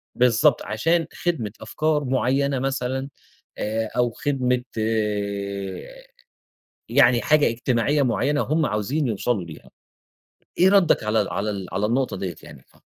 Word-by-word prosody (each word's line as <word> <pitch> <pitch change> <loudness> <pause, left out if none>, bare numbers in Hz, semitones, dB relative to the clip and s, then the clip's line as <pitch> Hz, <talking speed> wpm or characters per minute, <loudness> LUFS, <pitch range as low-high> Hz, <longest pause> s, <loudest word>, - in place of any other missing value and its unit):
بالضبط 125 +3 +3
عشان 165 +11 +1
خدمة 145 - -2
أفكار 150 +6 0
معيّنة 135 +1 +1
مثلًا، 130 0 -2 0.5
آآ 110 +1 -2
أو 120 -1 +2
خدمة 125 -1 -1
آآ، 105 - -3 0.8
يعني 120 -1 +4
حاجة 155 -1 +4
اجتماعية 125 +5 +1
معيّنة 140 +3 +1
هُم 155 +1 +1
عاوزين 125 +7 -1
يوصلوا 110 -2 -1
ليها، 80 -3 -12 0.9
إيه 185 - +6
ردك 195 - +4
على 110 +1 +2
ال 100 - -6
على 105 +2 -2
ال 100 -2 -5
على 100 +3 0
النقطة 125 +2 0
ديّة 95 -2 -4
يعني؟ - - -13
اتف - - -27
125 Hz, 135 wpm, -23 LUFS, 105-140 Hz, 0.9 s, إيه